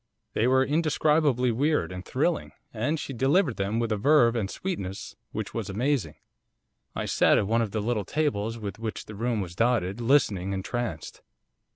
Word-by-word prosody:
They 115 - +2
were 130 +1 +4
indescribably 150 -4 +2
weird 145 +1 +1
and 90 0 -6
thrilling, - - -1 0.2
and 145 +9 -1
she 135 - -5
delivered 135 - +2
them 100 +3 -1
with 115 -1 -1
a 105 - +1
verve 120 0 +4
and 105 -5 -1
sweetness 100 - -5 0.2
which - - -5
was - - -4
amazing. 125 +5 -1 0.8
I - - -2
sat - - +4
at - - +2
one 115 +3 +2
of 115 - -1
the 110 +1 -2
little 110 -1 -1
tables 115 - -1
with 105 -3 -6
which 115 -1 -5
the 105 - -9
room 115 +1 -1
was 90 -3 -6
dotted, 115 -2 +1
listening 105 -7 +2
entranced. 120 +5 -4
115 Hz, 175 wpm, -27 LUFS, 105-140 Hz, 0.8 s, were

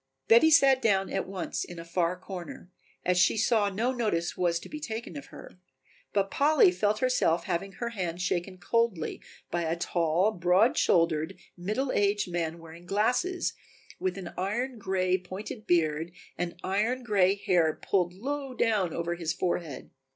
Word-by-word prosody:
Betty 235 +8 +7
sat 275 -4 +6
down 195 -4 +2
at - - -1
once 190 -2 -3
in 175 - -9
a 165 - -8
far 170 +1 0
corner, 180 -1 -8 0.3
as 180 0 +2
she 185 - +4
saw 215 -1 +3
no 225 +6 0
notice 210 -9 -1
was 170 -2 +1
to - - -10
be 305 - -7
taken 225 - -5
of 145 0 -8
her, - - -13 0.5
but 195 -1 0
Polly 310 +7 +5
felt 215 - 0
herself 210 -10 +2
having 185 +2 -3
her 235 +2 -4
hand 180 -6 -4
shaken 185 +1 -2
coldly 220 -3 -1 0.3
by 175 - 0
a 165 0 0
tall, 170 +3 +1
broad 185 +4 +3
shouldered, 165 -2 +2 0.2
middle 215 +9 -2
aged 205 -2 +1
man 170 -1 -2
wearing 165 +1 -13
glasses, 250 - 0 0.5
with 185 0 -2
an 180 -3 -7
iron 235 +6 -2
gray, 185 -1 +1
pointed 195 +5 -8
beard 160 -1 +1 0.2
and 175 -1 -3
iron 220 +7 0
gray 200 -4 +3
hair 175 -5 +1
pulled 180 -3 +1
low 270 +4 -4
down 210 -8 +1
over 170 0 -2
his 170 -2 -2
forehead. 170 -6 -3
190 Hz, 165 wpm, -28 LUFS, 175-225 Hz, 0.5 s, Betty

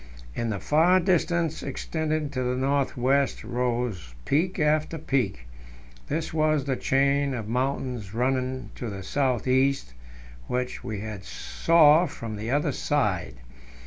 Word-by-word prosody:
In 115 - -2
the 100 -3 -2
far 170 - +4
distance, 170 -3 +1
extending 155 +2 -2
to 130 -3 -2
the 125 0 0
north 135 +1 0
west, 135 +2 +1
rose 120 - -2
peak 170 +6 +1
after 155 0 +1
peak; 125 - -1 0.6
this 160 +2 -2
was 155 -3 +2
the 135 -2 0
chain 140 +1 +1
of 110 -3 -5
mountains 125 -3 -2
running 130 +2 -1
to 120 - -4
the 100 -2 -6
south 130 +3 0
east, 130 - +2 0.5
which 125 0 -3
we 110 - -4
now 105 -2 -5
saw 155 - +4
from 115 -6 -6
the 110 +2 -5
other 145 +3 +1
side. 105 - -1
135 Hz, 140 wpm, -26 LUFS, 120-150 Hz, 0.6 s, far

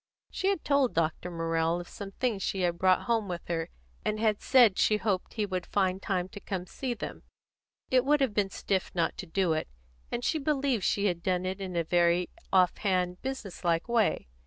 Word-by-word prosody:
She 380 - -2
had 390 -4 0
told 280 -3 +2
Dr. 165 +2 0
Morrell 165 0 0
of 175 - -8
some 200 - -8
things 235 -5 -1
she 190 0 -1
had 175 -1 0
brought 185 -1 +4
home 230 -3 0
with 175 -2 -5
her, 165 -1 -1 0.3
and 215 0 -1
had 215 -2 +1
said 240 -7 +5
she 215 - +4
hoped 200 -4 -2
he 215 -2 0
would 185 -3 -3
find 190 -1 +1
time 185 -2 -1
to 205 - -9
come 190 -2 -4
and 180 - -12
see 255 +3 -3
them. - - -6 0.7
It 255 -1 +5
would 295 +2 +3
have 265 -6 +1
been 205 -2 +1
stiff 190 -1 -1
not 170 -2 +1
to 190 - -5
do 175 0 +1
it, 155 - -2 0.4
and 240 0 -2
she 315 - +1
believed 275 -6 0
she 200 - +1
had 175 -4 0
done 180 0 0
it 190 +1 -3
in 185 -2 -5
a 170 - +1
very 175 +1 +2 0.2
off 185 -2 +4
hand, 180 -3 0
business 260 -10 -5
like 170 +2 +1
way. 230 - +1
190 Hz, 215 wpm, -29 LUFS, 175-230 Hz, 0.7 s, said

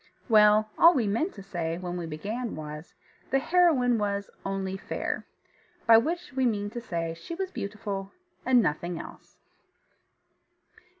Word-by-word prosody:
Well, 215 -1 +5
all 335 +1 +8
we 240 - +2
meant 230 - -1
to 195 - -9
say 170 -4 -3
when 180 -1 -5
we 175 -2 -4
began 215 +10 -4
was, 150 +1 -8 0.3
the 270 - +3
heroine 270 -7 +3
was 200 -1 -2
Only 195 -1 -3
Fair 195 - -4 0.6
by 225 -1 +8
which 340 +5 -3
we 260 0 0
mean 205 -2 -1
to 240 - -5
say 165 -6 -3
she 170 - -8
was 380 +1 -3
beautiful 200 - -5 0.3
and 250 -2 +4
nothing 170 +1 -2
else. - - -12
205 Hz, 145 wpm, -28 LUFS, 180-250 Hz, 0.6 s, all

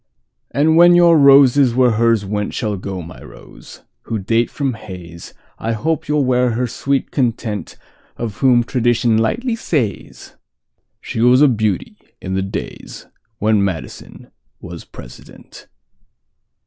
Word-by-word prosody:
And 155 +5 +2
when 175 +1 +7
your 170 -1 +5
roses 140 -3 +5
where 125 -1 +3
hers 115 -1 +1
wentShall 105 0 -3
go, 95 -3 -6
my 85 +2 -12
Rose, - - -15 0.2
who 115 - -3
date 115 +4 0
from 140 -3 -3
Hayes,I 95 +1 -9
hope 160 +7 -2
you 150 +1 0
'll 140 - +1
wear 125 -1 +1
her 125 +3 -1
sweet 135 +3 -2
contentOf 115 -2 -5
whom 125 -3 +3
tradition 120 -2 +1
lightly 230 - -1
says:She 120 - -6
was 125 +4 +5
a - - +7
beauty 110 - -2 0.2
in 95 - -6
the 95 - 0
daysWhen 110 +2 -5
Madison 95 -5 -6 0.3
was 85 -1 -10
President. - - -14
115 Hz, 120 wpm, -17 LUFS, 105-135 Hz, 0.3 s, when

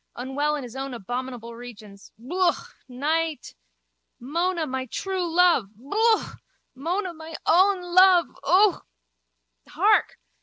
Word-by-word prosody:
Unwell 280 +4 -2
in 290 - -5
his 240 -2 -9
abominable 245 -2 -6
regions. 215 -4 -12
Yooka. 350 +9 -1
Night. 305 +3 -2 0.7
Mona, 335 +6 -1
my 260 -2 -4
true 370 +5 -3
love. 340 - +3
Yook. 430 - 0 0.4
Mona, 350 +7 -3
my 320 0 -10
own 375 +2 +3
love. 355 -1 +5 0.2
Ook. 370 +6 +3 0.8
Hark! - - +2
310 Hz, 105 wpm, -24 LUFS, 250-360 Hz, 0.8 s, love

